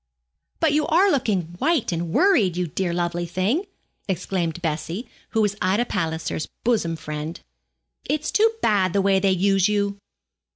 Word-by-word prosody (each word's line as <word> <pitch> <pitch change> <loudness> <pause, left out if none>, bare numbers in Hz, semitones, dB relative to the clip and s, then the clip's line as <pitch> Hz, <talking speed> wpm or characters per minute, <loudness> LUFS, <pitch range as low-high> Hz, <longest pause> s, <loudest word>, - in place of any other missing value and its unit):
'But 320 -3 +3
you 300 0 +2
are 375 +5 +4
looking 215 - +1 0.2
white 310 - +1
and 170 -1 -2
worried, 240 - +3
you 180 - 0
dear 175 +2 -2
lovely 175 0 -1
thing,' 200 - 0 0.4
exclaimed 180 -3 -2
Bessie, 165 - -3 0.2
who 225 - +1
was 205 -1 0
Ida 195 +6 +2
Palliser's 160 -5 -2 0.2
bosom 215 -9 +1
friend. 155 +1 -6 0.7
'It's 305 0 -1
too 445 +2 +4
bad 190 -4 +2
the 200 - +3
way 195 -1 +3
they 195 0 +2
use 195 +1 +3
you. 200 -1 0
195 Hz, 155 wpm, -23 LUFS, 175-235 Hz, 0.7 s, are